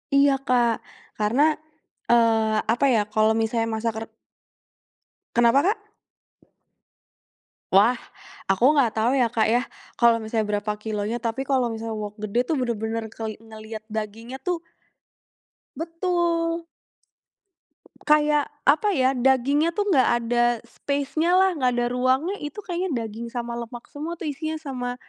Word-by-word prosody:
Iya, 280 Hz, 0 st, +6 dB
Kak, 245 Hz, -2 st, +3 dB, 0.5 s
karena, 215 Hz, +6 st, +1 dB, 0.7 s
eee, 225 Hz, -2 st, +3 dB, 0.2 s
apa 245 Hz, +4 st, +1 dB
ya 225 Hz, -, +4 dB
kalau 215 Hz, 0 st, +4 dB
misalnya 230 Hz, 0 st, 0 dB
masak 225 Hz, +1 st, -1 dB
re -, -, -4 dB, 1.3 s
Kenapa, 240 Hz, +3 st, +5 dB
Kak? 415 Hz, +7 st, +1 dB, 1.9 s
Wah, 205 Hz, +6 st, +6 dB, 0.6 s
aku 235 Hz, +10 st, +4 dB
nggak 255 Hz, -7 st, +2 dB
tahu 230 Hz, +4 st, +2 dB
ya, 250 Hz, -4 st, +3 dB
Kak, 225 Hz, -1 st, +1 dB
ya, 235 Hz, +3 st, +3 dB, 0.3 s
kalau 235 Hz, -1 st, +4 dB
misalnya 220 Hz, -2 st, -1 dB
berapa 210 Hz, +1 st, -2 dB
kilo 210 Hz, -2 st, -3 dB
nya, 230 Hz, +2 st, -3 dB
tapi 235 Hz, +4 st, -2 dB
kalau 260 Hz, -3 st, +1 dB
misalnya 225 Hz, 0 st, -4 dB
wok 210 Hz, +1 st, -6 dB
gede 215 Hz, +3 st, 0 dB
tuh 320 Hz, -, +1 dB
bener-bener 230 Hz, -2 st, -2 dB
keli 220 Hz, -1 st, -5 dB
ngelihat 220 Hz, -1 st, -10 dB
dagingnya 220 Hz, +4 st, -6 dB
tuh 345 Hz, +2 st, -3 dB, 1.1 s
Betul. 335 Hz, 0 st, -1 dB, 1.4 s
Kayak 300 Hz, -1 st, +4 dB, 0.2 s
apa 390 Hz, +7 st, +3 dB
ya 260 Hz, -2 st, +3 dB
dagingnya 270 Hz, +5 st, +2 dB
tuh 410 Hz, -1 st, 0 dB
nggak 270 Hz, -7 st, +4 dB
ada 240 Hz, +1 st, +2 dB, 0.2 s
spacenya 290 Hz, +5 st, -1 dB
lah, 380 Hz, +1 st, +5 dB
nggak 260 Hz, -7 st, +1 dB
ada 240 Hz, 0 st, +1 dB
ruangnya 260 Hz, +10 st, +1 dB
itu 295 Hz, +8 st, -7 dB
kayaknya 350 Hz, -9 st, -2 dB
daging 225 Hz, +2 st, -6 dB
sama 235 Hz, 0 st, -4 dB
lemak 235 Hz, 0 st, -7 dB
semua 315 Hz, +4 st, -5 dB
tuh 340 Hz, -, -9 dB
isinya, 315 Hz, +3 st, -4 dB
sama 255 Hz, -5 st, -4 dB
245 Hz, 135 wpm, -24 LUFS, 225-295 Hz, 1.9 s, Iya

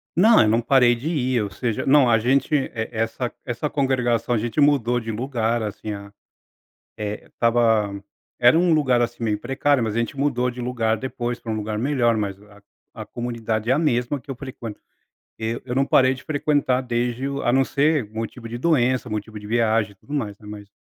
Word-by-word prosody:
Não, 220 Hz, +6 st, +6 dB
eu 110 Hz, -, +4 dB
não 115 Hz, +2 st, +2 dB
parei 120 Hz, 0 st, +4 dB
de 130 Hz, +7 st, -6 dB
ir 130 Hz, -7 st, 0 dB
ou 100 Hz, -, -4 dB
seja 115 Hz, -1 st, -2 dB
não 135 Hz, -2 st, +5 dB
a 115 Hz, -, +5 dB
gente, 135 Hz, +6 st, +1 dB
e 140 Hz, -, 0 dB, 0.2 s
essa 115 Hz, +2 st, -2 dB
essa 125 Hz, +5 st, -3 dB
congregação 125 Hz, -4 st, 0 dB
a -, -, +2 dB
gente 115 Hz, +6 st, -2 dB
mudou 130 Hz, -5 st, +3 dB
de 115 Hz, -1 st, -5 dB
lugar, 115 Hz, 0 st, -1 dB
assim 105 Hz, 0 st, -5 dB
a 100 Hz, 0 st, -9 dB, 0.9 s
eh, 105 Hz, 0 st, -5 dB
estava 115 Hz, -3 st, +2 dB, 0.5 s
era 120 Hz, +5 st, +6 dB
um 175 Hz, -1 st, +3 dB
lugar, 130 Hz, -6 st, +3 dB
assim, 120 Hz, 0 st, -2 dB
meio 105 Hz, -2 st, 0 dB
precário, 135 Hz, +2 st, +1 dB
mas 110 Hz, -1 st, -2 dB
a 115 Hz, -, +1 dB
gente 120 Hz, +5 st, -3 dB
mudou 125 Hz, -3 st, 0 dB
de 125 Hz, -, -10 dB
lugar 115 Hz, -3 st, 0 dB
depois 120 Hz, 0 st, -4 dB
pra 115 Hz, -, -5 dB
um 110 Hz, -, -1 dB
lugar 105 Hz, 0 st, -3 dB
melhor, 120 Hz, -2 st, +2 dB
mas 100 Hz, -2 st, -3 dB
a 105 Hz, -1 st, -18 dB, 0.4 s
a -, -, -6 dB
comunidade 115 Hz, -2 st, -3 dB
é -, -, +5 dB
a 140 Hz, -, +2 dB
mesma 130 Hz, -3 st, 0 dB
que 140 Hz, +2 st, -8 dB
eu 135 Hz, -, -5 dB
frequento. 120 Hz, -5 st, -8 dB, 0.6 s
Eu 115 Hz, +1 st, -3 dB
eu 125 Hz, -1 st, -4 dB
não 135 Hz, +1 st, +2 dB
parei 130 Hz, 0 st, +4 dB
de 130 Hz, -, -12 dB
frequentar 145 Hz, -3 st, +1 dB
desde 120 Hz, +1 st, -2 dB
o 140 Hz, 0 st, -4 dB
a -, -, +2 dB
não 135 Hz, 0 st, +4 dB
se, 145 Hz, +1 st, +2 dB
motivo 115 Hz, +2 st, -6 dB
de 120 Hz, +1 st, -5 dB
doença, 130 Hz, -5 st, +1 dB
motivo 105 Hz, 0 st, -5 dB
de 105 Hz, -, -10 dB
viagem 110 Hz, -1 st, +1 dB
e -, -, -21 dB
tudo 115 Hz, +9 st, -15 dB
mais, 110 Hz, -8 st, -3 dB
né, 105 Hz, -, -16 dB
mas 105 Hz, -1 st, -9 dB
120 Hz, 210 wpm, -23 LUFS, 110-135 Hz, 0.9 s, Não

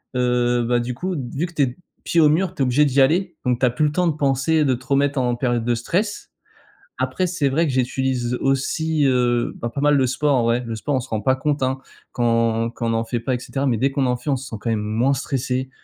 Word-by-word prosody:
heu, 125 Hz, -1 st, +1 dB
bah, 120 Hz, +1 st, +1 dB
du 120 Hz, +1 st, -3 dB
coup, 180 Hz, +9 st, -3 dB, 0.2 s
vu 160 Hz, +6 st, -1 dB
que 175 Hz, -, -15 dB
tu 150 Hz, -, +2 dB
es 125 Hz, -1 st, -2 dB, 0.3 s
pieds 170 Hz, -, +3 dB
au 150 Hz, -, +6 dB
mur, 175 Hz, +4 st, +1 dB
tu -, -, -4 dB
es -, -, +5 dB
obligé 130 Hz, +4 st, +3 dB
d'y 140 Hz, -1 st, +3 dB
aller 175 Hz, +5 st, +2 dB
donc 125 Hz, -1 st, +1 dB
tu 130 Hz, -, +3 dB
as -, -, +4 dB
plus 125 Hz, +6 st, 0 dB
le 150 Hz, -, +1 dB
temps 180 Hz, +3 st, +1 dB
de 160 Hz, -, 0 dB
penser 145 Hz, +2 st, +1 dB
de 135 Hz, -3 st, +2 dB
te 125 Hz, +1 st, -6 dB
remettre 140 Hz, 0 st, +1 dB
en 125 Hz, -1 st, +1 dB
période 120 Hz, -2 st, -1 dB
de 120 Hz, 0 st, +1 dB
stress. 190 Hz, -, -2 dB, 0.7 s
Après, 185 Hz, -, -1 dB
c'est 160 Hz, -6 st, 0 dB
vrai 160 Hz, +5 st, +1 dB
que -, -, -1 dB
j'utilise 130 Hz, -1 st, 0 dB
aussi, 145 Hz, +3 st, 0 dB
heu, 125 Hz, -2 st, +1 dB
bah, 120 Hz, -, -2 dB
pas 140 Hz, -, -3 dB
mal 145 Hz, 0 st, +4 dB
le 130 Hz, -2 st, +2 dB
sport 145 Hz, +3 st, +1 dB
en 125 Hz, -, +2 dB
vrai. 115 Hz, +2 st, +1 dB
Le 115 Hz, -1 st, -4 dB
sport, 140 Hz, +6 st, -2 dB
on 130 Hz, -, +1 dB
se 130 Hz, -, -11 dB
rend 110 Hz, -, -1 dB
pas 130 Hz, +5 st, +2 dB
compte, 145 Hz, +1 st, -1 dB
hein. 130 Hz, +1 st, 0 dB, 0.3 s
Quand 115 Hz, -1 st, +1 dB
quand 115 Hz, -1 st, -4 dB
on -, -, +1 dB
en 115 Hz, 0 st, 0 dB
fait 120 Hz, +1 st, -2 dB
pas 125 Hz, +2 st, -1 dB
et -, -, -4 dB
cetera 135 Hz, +2 st, -3 dB
mais 125 Hz, -4 st, +1 dB
dès 135 Hz, +5 st, +1 dB
qu'on 135 Hz, -1 st, 0 dB
en 125 Hz, -1 st, +1 dB
fait, 125 Hz, +5 st, -6 dB
on 135 Hz, -, +2 dB
se 135 Hz, -, -8 dB
sent -, -, -6 dB
quand 115 Hz, -, -2 dB
même 110 Hz, -2 st, 0 dB
moins 110 Hz, +6 st, +1 dB
stressé, 130 Hz, -1 st, -2 dB
130 Hz, 275 wpm, -21 LUFS, 120-145 Hz, 0.7 s, au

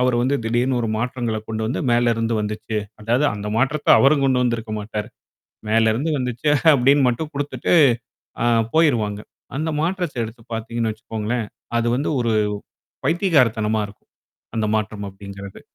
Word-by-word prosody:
அவரு 125 Hz, -1 st, +2 dB
வந்து 130 Hz, +3 st, +1 dB
திடீர்னு 120 Hz, +2 st, +1 dB
ஒரு 115 Hz, -, -1 dB
மாற்றங்கள்ல 120 Hz, -2 st, -2 dB
கொண்டு 110 Hz, 0 st, -3 dB
வந்து 125 Hz, -, -2 dB
மேல 120 Hz, 0 st, +3 dB
இருந்து 115 Hz, 0 st, 0 dB
வந்துச்சு. 105 Hz, +1 st, -3 dB, 0.2 s
அதாவது 120 Hz, +7 st, +1 dB
அந்த 105 Hz, 0 st, -5 dB
மாற்றத்த 145 Hz, +4 st, 0 dB
அவரும் 140 Hz, +1 st, +4 dB
கொண்டு 125 Hz, -1 st, +2 dB
வந்திருக்க 115 Hz, -3 st, -1 dB
மாட்டாரு. 105 Hz, +1 st, -5 dB, 0.6 s
மேல 110 Hz, 0 st, +4 dB
இருந்து 140 Hz, +8 st, -1 dB
வந்துச்சு 125 Hz, +3 st, -1 dB, 0.2 s
அப்படின்னு 135 Hz, +2 st, +4 dB
மட்டும் 150 Hz, +6 st, -3 dB
குடுத்துட்டு. 145 Hz, +4 st, -1 dB, 0.7 s
ஆ -, -, +1 dB, 0.3 s
போயிருவாங்க. 115 Hz, -10 st, +2 dB, 0.4 s
அந்த 160 Hz, +2 st, -1 dB
மாற்றத்த 170 Hz, -7 st, -1 dB
எடுத்து 115 Hz, +1 st, -10 dB
பார்த்தீங்கன்னு 115 Hz, 0 st, -2 dB
வச்சுக்கோங்களேன். 110 Hz, +1 st, -3 dB, 0.3 s
அது 115 Hz, -, 0 dB
வந்து 140 Hz, -, -1 dB
ஒரு 115 Hz, -1 st, +1 dB, 0.7 s
பைத்திகாரத்தனமா 125 Hz, -, +2 dB
இருக்கும். 100 Hz, -, -18 dB, 0.5 s
அந்த 110 Hz, -1 st, +1 dB
மாற்றம் 105 Hz, -1 st, -3 dB
அப்படிங்கிறது. 100 Hz, 0 st, -10 dB
120 Hz, 145 wpm, -21 LUFS, 110-135 Hz, 0.7 s, அவரும்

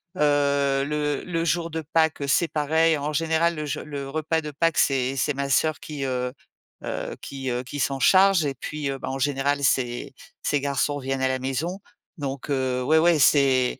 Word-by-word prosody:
Heu, 140 Hz, -2 st, +2 dB
le 150 Hz, -1 st, -1 dB
le 165 Hz, -2 st, -2 dB
jour 170 Hz, 0 st, 0 dB
de 160 Hz, 0 st, -4 dB
Pâques, 160 Hz, -2 st, +2 dB
heu, 140 Hz, -, -2 dB
c'est 170 Hz, +4 st, +3 dB
pareil. 160 Hz, +1 st, +2 dB
En 145 Hz, +1 st, -3 dB
général, 165 Hz, +2 st, +1 dB
le 155 Hz, -1 st, -4 dB
je 145 Hz, -, -3 dB
le 140 Hz, -2 st, -6 dB
repas 155 Hz, +2 st, -1 dB
de 150 Hz, -1 st, -6 dB
Pâques, 165 Hz, +2 st, 0 dB
c'est 135 Hz, -1 st, +2 dB
c'est 150 Hz, +3 st, +1 dB
ma 140 Hz, 0 st, -3 dB
sœur 155 Hz, +3 st, +1 dB
qui, 145 Hz, -3 st, -5 dB
heu 125 Hz, -1 st, -2 dB, 0.5 s
heu, -, -, -4 dB
qui, 135 Hz, -1 st, -5 dB
heu, 120 Hz, 0 st, -1 dB
qui 135 Hz, +3 st, -7 dB
s'en 135 Hz, 0 st, 0 dB
charge. 190 Hz, 0 st, +5 dB
Et 140 Hz, -1 st, -2 dB
puis, 150 Hz, +1 st, -4 dB
heu, 135 Hz, -, -3 dB
bah, -, -, -5 dB
en 135 Hz, +1 st, -3 dB
général, 140 Hz, +1 st, 0 dB
ses 120 Hz, -2 st, 0 dB, 0.3 s
ses 145 Hz, -, +1 dB
garçons 140 Hz, +1 st, 0 dB
viennent 135 Hz, 0 st, -3 dB
à 130 Hz, -, +2 dB
la 130 Hz, 0 st, -1 dB
maison. 140 Hz, +9 st, -3 dB, 0.4 s
Donc, 140 Hz, -2 st, -5 dB
heu, 130 Hz, -2 st, 0 dB
ouais, 155 Hz, +5 st, +3 dB
ouais, 170 Hz, 0 st, +4 dB
c'est 135 Hz, -3 st, +3 dB
145 Hz, 205 wpm, -24 LUFS, 135-155 Hz, 0.5 s, charge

